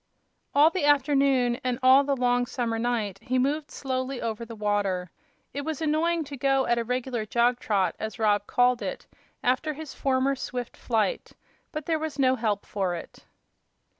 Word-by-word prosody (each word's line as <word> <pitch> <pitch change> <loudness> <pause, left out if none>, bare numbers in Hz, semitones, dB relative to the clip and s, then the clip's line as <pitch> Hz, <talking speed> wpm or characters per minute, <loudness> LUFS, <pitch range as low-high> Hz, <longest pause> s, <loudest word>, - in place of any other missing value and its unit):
All 300 +3 +6
the 370 -4 -2
afternoon 275 -4 +3
and 250 -1 0
all 260 +2 +7
the 280 0 0
long 245 -1 +1
summer 230 -3 -2
night 225 -5 -1
he 255 0 -1
moved 290 +4 0
slowly 260 -1 -3
over 230 0 -3
the 230 0 -9
water. 200 -4 -1 0.4
It 285 - -3
was 315 0 -4
annoying 325 +2 +1
to 285 -1 -8
go 270 0 +2
at 240 0 +2
"a - - 0
reg'lar 250 -1 -2
jog 240 +2 +2
trot," 200 -3 0
as 220 +1 -5
Rob 205 -2 +2
called 245 0 +3
it, - - -5 0.4
after 260 +5 +1
his 310 0 -8
former 270 0 +1
swift 245 -2 -5
flight; 235 - -1 0.4
but 305 -1 -5
there 320 -2 0
was 310 -2 -4
no 260 -2 +3
help 215 -4 -1
for 190 -3 -2
it. 170 - -10
255 Hz, 175 wpm, -26 LUFS, 230-280 Hz, 0.4 s, all